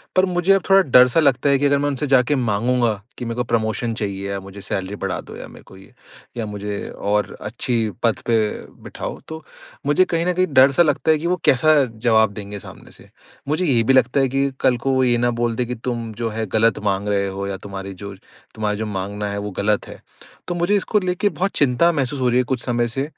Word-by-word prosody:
पर 185 +1 +4
मुझे 180 +1 +2
अब 195 - +2
थोड़ा 195 0 +7
डर 125 +1 +7
सा 145 +7 +1
लगता 140 -2 +2
है 140 - +4
कि 145 - +1
अगर 140 0 +3
मैं 145 +1 0
उनसे 140 +1 -2
जाके 135 +2 +3
माँगूँगा 120 0 +1 0.2
कि 120 - -5
मेरे 115 0 -4
को 125 - -1
प्रमोशन 115 0 -1
चाहिए 100 -2 -4
या 100 - -3
मुझे 100 +1 -11
सैलरी 95 +1 -4
बढ़ा - - -3
दो - - -12
या - - -8
मेरे - - -15
को 95 - -16
ये, 95 - -17 0.4
या 115 - -2
मुझे 105 -1 -5
और 105 +1 -2
अच्छी 120 -2 -2 0.2
पद 115 -2 +2
पे 115 -1 +2 0.5
बिठाओ - - -6
तो 160 0 -8 0.4
मुझे 145 +6 +3
कहीं 165 +1 +1
न 180 - +1
कहीं 185 +1 +1
डर 135 +1 +7
सा 170 +6 +4
लगता 160 0 +1
है 155 - +3
कि 165 +3 -3
वो 180 - +2
कैसा 155 +5 +5 0.2
जवाब 110 -2 +3
देंगे 100 -1 -7
सामने - - -13
से। - - -13 0.4
मुझे 160 +5 0
ये 125 -6 +3
भी 135 - +3
लगता 130 +1 +3
है 135 -1 +2
कि 135 +1 0
कल 125 -2 +2
को 135 +3 -1
वो 130 0 +2
ये 120 -1 +3
ना 120 0 +1
बोल 120 -1 0
दे 125 - -1
कि 125 +1 -4
तुम 115 -1 -4
जो 115 +1 -3
है 110 +1 -3
गलत 110 +2 +2
माँग 100 +1 0
रहे 100 -1 +1
हो 100 +1 -4
या 95 -1 -4
तुम्हारी 100 0 -7
जो 100 0 -6 0.4
तुम्हारे 105 -1 -2
जो 110 - -3
माँगना 100 +1 -4
है 100 - -4
वो 105 0 -5
गलत 105 0 0
है, - - -11 0.5
तो 175 - -2
मुझे 175 +4 +1
इसको 210 +1 +1
लेके 185 +2 0
बहुत 195 +1 -2
चिंता 145 +5 +3
महसूस 140 -2 -2
हो 125 - +1
रही 120 - +2
है 125 - +3
कुछ 125 -1 -3
समय 120 -1 0
से। 135 +4 -3
120 Hz, 245 wpm, -21 LUFS, 105-140 Hz, 0.5 s, थोड़ा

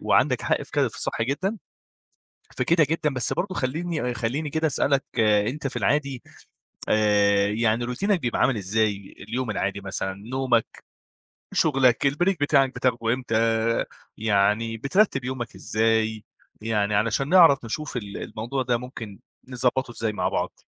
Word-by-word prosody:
وعندَك - - +2
حق - - 0
في - - -12
ك - - +1
في - - -12
الصح - - -2
جدًا، 180 - -1 1.0
فكده 165 -2 +3
جدًا، 155 -2 0
بس 130 - -1
برضه 185 +1 -2
خلّيني 145 -1 -2
خلّيني 125 +7 -2
كده 160 +2 0
أسألك 140 -1 +1
أنت 110 +6 +2
في - - -5
العادي 140 -3 0 0.7
آآ 100 -1 +3
يعني 115 +2 +1
روتينك 185 - 0
بيبقى 120 -4 -2
عامل 130 - +3
إزاي؟ 100 0 -1
اليوم 125 +1 -2
العادي 100 -1 -2
مثلًا، 95 0 -3
نومَك، 120 +3 -1 0.7
شُغلَك، 135 -3 +3
الBreak 175 +7 +1
بتاعَك 135 -3 +3
بتاخده 120 -2 +1
إمتى؟ 125 -3 -3 0.8
يعني 110 +2 +1
بترتب 135 - +1
يومَك 125 -3 -5
إزاي؟ 110 -1 0 0.4
يعني 105 -2 0
علشان 115 +7 0
نعرف 165 -8 +6
نشوف 145 +4 -4
ال 100 -4 -6
الموضوع 120 +5 -4
ده 120 -1 +1
ممكن 115 -5 -9 0.3
نضبّطه 125 0 -1
إزاي 110 -2 -3
مع - - -1
بعض. - - -3
120 Hz, 140 wpm, -24 LUFS, 110-140 Hz, 1.0 s, نعرف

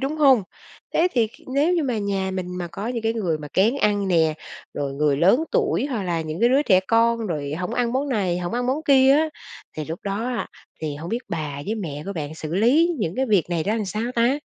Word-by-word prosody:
đúng 275 +3 -2
hông? 270 -7 +5 0.5
Thế 345 - +4
thì 235 -3 +3
kh 215 - -18
nếu 305 +6 +3
như 340 - +1
mà 250 -6 -1
nhà 195 -2 -1
mình 180 -1 -4
mà 175 - -3
có 205 - -5
những 240 -2 -3
cái 225 0 +1
người 180 -9 -1
mà 150 -1 -8
kén 215 +7 +3
ăn 205 -6 +1
nè, 160 -3 +3 0.4
rồi 140 -1 -3
người 145 0 +1
lớn 195 - +4
tuổi - - +1
hoặc 245 -8 -3
là 175 -3 -1
những 155 +2 -5
cái 235 - +5
đứa 270 +3 +4
trẻ 185 -9 +4
con, 230 0 +2
rồi 150 -5 -3
hổng 180 +7 -3
ăn 240 -1 0
món 275 +3 -1
này, 190 -8 0
hổng 175 -1 -4
ăn 245 0 -1
món 265 +4 +1
kia 270 -1 +6
á, 315 +3 +3 0.5
thì 155 - -3
lúc 160 +3 -5
đó 200 +3 -2
á, 245 -1 -2 0.3
thì 155 -2 -3
hông 160 +3 -7
biết 230 - -1
bà 145 -3 -4
với 215 - -1
mẹ 155 -9 -5
của 200 - -3
bạn 155 -3 -5
xử 160 0 -5
lý 255 - +4
những 175 -6 -2
cái 265 +1 +1
việc 200 -6 +2
này 170 -2 0
ra 205 - 0
làm 220 - -1
sao 210 +3 -3
ta? 240 +4 +2
205 Hz, 255 wpm, -23 LUFS, 170-245 Hz, 0.5 s, kia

